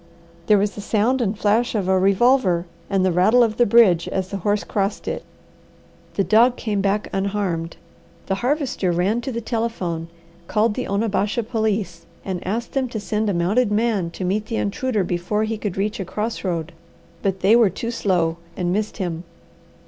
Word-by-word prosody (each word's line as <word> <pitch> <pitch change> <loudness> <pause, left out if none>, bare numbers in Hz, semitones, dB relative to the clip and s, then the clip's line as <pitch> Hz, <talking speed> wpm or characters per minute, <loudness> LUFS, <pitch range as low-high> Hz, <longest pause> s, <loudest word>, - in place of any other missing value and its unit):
There 210 - +6
was 205 +1 +1
the 205 - -7
sound 225 +5 +1
and 210 -2 -1
flash 225 +3 +1
of 200 -4 0
a 190 0 +3
revolver, 195 -2 +3 0.2
and 190 -1 +2
the 185 - +3
rattle 215 +8 +5
of 220 -1 0
the 240 - +4
bridge 200 -7 +5
as 190 -1 -2
the 200 - -3
horse 205 +2 0
crossed 200 0 -2
it. - - -3 0.9
The 195 - +2
dog 235 +5 +4
came 210 -5 -2
back 200 +1 0
unharmed. 190 -4 -2 0.5
The 195 - -1
Harvester 260 - 0
ran 190 +7 +1
to 265 - -4
the 235 -1 -3
telephone, 220 -8 -2 0.4
called 215 0 +2
the 255 - -4
Onabasha 210 +2 0
police, 215 -6 -2 0.2
and 185 -2 -4
asked 230 +5 -2
them 265 -2 -1
to 225 - -4
send 210 +1 -1
a - - +1
mounted 205 +7 +2
man 210 -5 +1
to 185 - -3
meet 210 +4 -1
the 230 - -3
intruder 215 +1 -1
before 180 +5 -1
he 220 +1 -1
could 205 -4 -4
reach 210 +2 -1
a - - -1
cross 215 +5 -3
road; 170 -3 -2 0.5
but 190 -1 -1
they 200 +4 +5
were 235 -4 +5
too 230 +6 -4
slow 175 -7 0 0.2
and 180 -1 0
missed 215 +2 -2
him. 175 -4 -3
205 Hz, 185 wpm, -22 LUFS, 185-225 Hz, 0.9 s, There